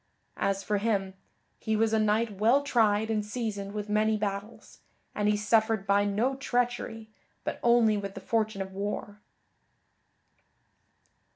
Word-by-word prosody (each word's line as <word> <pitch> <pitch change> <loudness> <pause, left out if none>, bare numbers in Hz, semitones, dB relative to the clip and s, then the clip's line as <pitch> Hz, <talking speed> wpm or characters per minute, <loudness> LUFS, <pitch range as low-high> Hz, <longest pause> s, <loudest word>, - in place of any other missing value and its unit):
As 195 0 0
for 210 -1 0
him, 195 -3 0 0.5
he 220 - -1
was 225 +1 +2
a 220 - +3
knight 215 -1 +1
well 240 +7 +4
tried 220 -5 +2
and 215 -1 0
seasoned 210 -3 -4
with 210 0 -4
many 215 +1 +2
battles, 205 +1 -5 0.3
and 210 0 +1
he 210 - +2
suffered 220 -1 +2
by 200 +1 +3
no 215 +6 +1
treachery 240 -4 -2 0.3
but - - -4
only 235 -3 +4
with 200 -1 -5
the - - -5
fortune 215 -3 -1
of 190 - -11
war." 205 +1 -5
215 Hz, 145 wpm, -28 LUFS, 205-225 Hz, 0.5 s, well